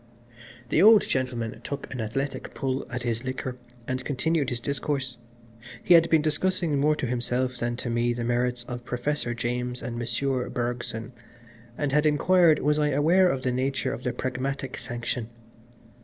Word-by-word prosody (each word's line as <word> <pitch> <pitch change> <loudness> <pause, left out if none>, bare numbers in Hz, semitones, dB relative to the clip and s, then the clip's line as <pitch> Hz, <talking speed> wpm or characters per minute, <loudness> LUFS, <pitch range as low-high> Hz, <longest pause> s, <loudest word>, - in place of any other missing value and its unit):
IV 120 - -26
The - - +3
old 215 +1 +8
gentleman 120 -4 -2
took 140 +1 -5
an 125 - -3
athletic 135 +5 -3
pull 135 0 -2
at 125 0 -4
his 120 0 -2
liquor, 130 -1 -4 0.3
and 130 0 -2
continued 145 +1 0
his 125 - -3
discourse. 135 -1 -2 0.7
He 175 - +5
had 165 0 +6
been 160 -2 +4
discussing 160 -1 +1
more 150 +2 +3
to 145 - -2
himself 125 +1 -1
than 120 0 -1
to 120 - -4
me 120 +1 +1
the 120 0 -2
merits 120 +1 0
of 120 0 -6
Professor 125 0 -2
James 125 +1 -2
and 120 -1 -4
Monsieur 125 +2 -1
Bergson, 120 -1 -3 0.6
and 145 -2 -1
had 150 +2 +3
inquired 165 +2 +5
was 150 +1 +3
I 150 - +3
aware 165 +6 +4
of 130 -5 -2
the 130 - +1
nature 130 +2 -1
of - - -6
the 125 - 0
Pragmatic 130 +1 -3
Sanction. 120 -1 -4
130 Hz, 170 wpm, -26 LUFS, 120-145 Hz, 0.7 s, old